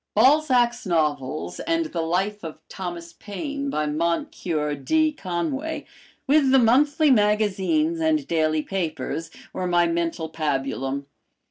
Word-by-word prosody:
Balzac's 250 -1 +4
novels, 155 -1 -1
and 330 0 0
the 230 - -3
"Life 190 +6 -1
of 160 -2 -7
Thomas 175 -2 -6
Paine" 280 - -5
by 155 - -1
Moncure 155 0 -1
D. 310 - +1
Conway, 270 - -3 0.4
with 285 -1 +4
the 265 - +6
monthly 285 +5 +4
magazines 215 - +2
and 315 -3 +1
daily 155 -2 +1
papers, 165 -4 -3 0.2
were 185 - -2
my 175 -1 +3
mental 170 -1 -1
pabulum. 140 -3 -2
185 Hz, 120 wpm, -24 LUFS, -, 0.4 s, the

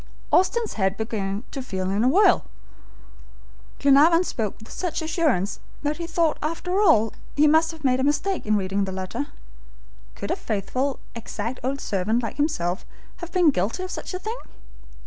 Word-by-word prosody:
Austin's 450 +5 +2
head 190 -1 0
began 210 -2 -3
to 275 - -4
feel 190 -6 -3
in 205 +3 +1
a - - +4
whirl. 395 +9 +5 1.4
Glenarvan 300 +5 +6
spoke 220 - -3
with 220 - -14
such 355 -4 -2
assurance 305 - 0 0.2
that 295 +1 0
he 340 -1 -4
thought 330 -2 +1
after 360 +5 -1
all 265 - +4 0.2
he 295 - +5
must 320 +2 +5
have 320 -2 -9
made 255 -1 +3
a - - +1
mistake 295 - 0
in 215 0 +3
reading 195 +1 0
the 190 - -4
letter. 190 +10 -4 0.9
Could - - -4
a - - +2
faithful, 255 - -2 0.2
exact 230 +1 -5
old 270 +2 -1
servant 215 +4 0
like 230 - -4
himself 210 - 0 0.3
have 345 -1 -8
been 350 -4 +5
guilty 230 - -1
of 370 - -5
such - - -5
a - - -1
thing! 440 +6 -5
275 Hz, 170 wpm, -24 LUFS, 210-330 Hz, 1.4 s, Glenarvan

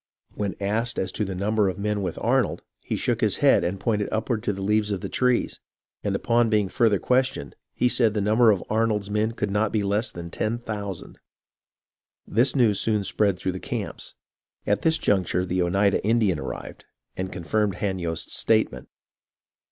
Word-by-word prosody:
When 100 -2 -3
asked 110 +4 -1
as 95 - -1
to 105 - -2
the 95 -1 -4
number 105 +1 +1
of 90 - -5
men 105 0 -1
with 90 -4 -3
Arnold, - - +1 0.2
he - - -4
shook - - -1
his - - +3
head - - +4
and 90 +3 -2
pointed 105 -2 0
upward 110 +1 -1
to 105 - -1
the 95 -1 -5
leaves 105 +1 +1
of 100 -3 -2
the - - -5
trees; 125 -1 +1 0.4
and - - -1
upon 120 0 +2
being 105 -3 +2
further 110 -2 +3
questioned, 125 - 0 0.2
he 125 - +2
said 115 -3 +3
the - - +1
number 110 +3 +4
of 100 -4 +2
Arnold's 110 -2 0
men 110 +2 0
could 105 -3 -2
not 105 +1 +1
be 105 -2 0
less 105 +3 0
than 85 -3 -8
ten 110 +6 -1
thousand. 105 -6 -6 0.6
" - - -59
This 120 +4 +3
news 115 -7 +3
soon 105 -2 +1
spread 100 0 +1
through 95 0 -2
the 95 - -6
camps. - - -6 0.5
At 105 - +1
this 160 0 +3
juncture 90 -2 +1
the 90 0 -1
Oneida 100 +3 +2
[Indian] 105 -6 +2
arrived, - - -7 0.3
and 95 0 -4
confirmed 100 +2 -1
Hanyost's 90 -4 -3
statement. - - +1
105 Hz, 185 wpm, -25 LUFS, 95-110 Hz, 0.6 s, head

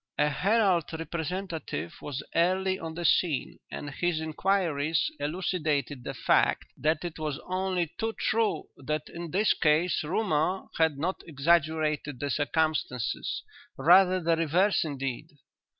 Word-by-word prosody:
"'A 150 0 +3
Herald 190 +2 +2
representative 165 - -4
was 145 0 -5
early 185 +2 +2
on 160 -1 -6
the 175 0 -4
scene, 165 -6 +1
and 145 - -6
his 175 +2 0
inquiries 160 -2 0
elucidated 150 -4 -1
the - - -5
fact - - +2
that 155 +4 0
it 165 -2 -6
was 150 -3 -2
only 185 -1 0
too 225 0 0
true 225 0 +1
that 150 +2 -3
in 170 0 -7
this 200 +6 +3
case 155 +3 +2
rumour 180 +1 0 0.2
had 160 -3 +3
not 175 +6 -2
exaggerated 155 -2 +1
the 145 +1 -2
circumstances, 145 -5 -1 0.3
rather 185 +5 +6
the 165 -1 +2
reverse 170 +5 +2
indeed. 135 -2 -4
160 Hz, 130 wpm, -28 LUFS, 150-180 Hz, 0.3 s, rather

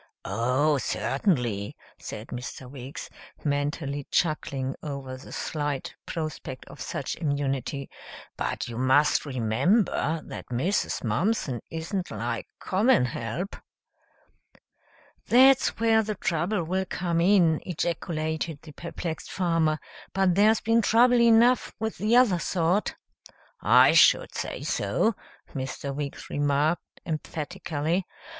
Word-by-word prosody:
"Oh, 130 +8 +1
certainly," 125 - -1 0.2
said 105 - -7
Mr. 125 +1 -6
Weeks, 130 +1 -8 0.4
mentally 145 -1 -2
chuckling 140 -5 0
over 140 -3 -5
the 130 - -12
slight 145 -3 -3
prospect 155 -5 -5
of - - -12
such - - -3
immunity, 140 -2 -2 0.5
"but - - -3
you 120 0 -5
must 135 +4 +3
remember 155 - +1
that - - -8
Mrs. 135 +12 -1
Mumpson 130 - 0
isn't 170 +4 -3
like - - -3
common 210 - +3
help 120 - -4 0.9
" - - -32
"That's 260 +2 +6
where 225 -1 +4
the 215 -1 -3
trouble 175 +1 0
will 190 +3 -1
come 170 -2 0
in," 175 -4 +4
ejaculated 160 -2 -2
the 155 - -11
perplexed 170 +1 -6
farmer, 165 -4 +1 0.4
"but 190 -2 +3
there's 210 +3 +4
been 230 +2 +3
trouble 240 +3 +5
enough 235 +2 +4
with 220 0 -3
the 215 +3 +2
other 235 -8 +5
sort." 175 +4 0 0.7
"I - - +6
should - - +5
say - - -4
so," 225 - +1 0.4
Mr. 135 +1 -4
Weeks 140 0 -5
remarked 145 +3 0
emphatically. 160 +1 -3
160 Hz, 115 wpm, -27 LUFS, 140-190 Hz, 0.9 s, That's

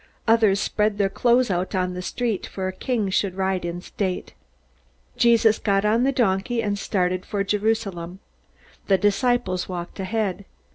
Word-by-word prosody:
Others 220 -3 +4
spread 210 0 0
their 195 -2 +1
clothes 240 0 +2
out 180 +2 -1
on 180 -1 0
the 180 - -5
street, 220 +3 -2
for 190 -1 -4
a 185 - -3
king 215 -1 -1
should 190 -1 0
ride 190 -1 -1
in 175 +1 -4
state. 185 -1 -4 0.8
Jesus 230 -2 +4
got 200 -1 +1
on 220 +3 +3
the 275 - +3
donkey, 235 -2 0
and 205 -1 -1
started 185 -2 0
for 200 -1 -2
Jerusalem. 200 -4 -1 0.7
The 195 - +4
disciples 205 -1 +1
walked 175 +1 -6
ahead. 200 0 -2
200 Hz, 155 wpm, -23 LUFS, 185-225 Hz, 0.8 s, Others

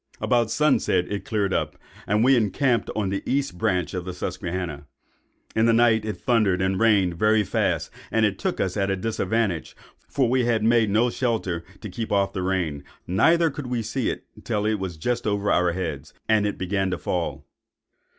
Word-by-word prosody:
"About 120 -3 +1
sunset 125 -10 +2
it 100 - -3
cleared 100 -4 0
up, - - -1 0.3
and 105 +2 +2
we 135 +2 +5
encamped 120 +1 +1
on 105 -3 0
the 100 0 -2
east 140 -8 -1
branch 90 -4 0
of 90 -1 -3
the 90 0 -6
Susquehanna. 90 -5 -4 0.7
In 110 +1 +3
the 115 - +4
night 115 -2 +4
it 105 -4 -3
thundered 105 -6 +2
and 95 0 0
rained 100 -6 +3
very 110 0 +4
fast, - - -1 0.2
and 110 -1 +2
took - - -2
us 95 -1 -1
at 100 -2 0
a 95 - +1
disadvantage; 105 -2 -1 0.3
for 135 -3 +1
we 125 0 +2
had 115 -2 +1
made 115 -1 +3
no 115 +4 +2
shelter 110 -10 -1 0.2
to 110 - -6
keep 115 +4 -5
off 100 -1 +1
the 95 - -3
rain, 90 -6 -1 0.2
neither 165 - +3
could 135 -1 -6
we 120 -2 -2
see 115 +3 -1
it - - -5 0.2
till 105 -3 -1 0.2
just 95 +9 -3
over 100 0 0
our 90 -1 +3
heads, 80 -7 -5
and 110 -2 +3
it 105 - -3
began 95 +1 -1
to 90 - -2
fall. 85 -1 -3
105 Hz, 185 wpm, -24 LUFS, 95-115 Hz, 0.7 s, we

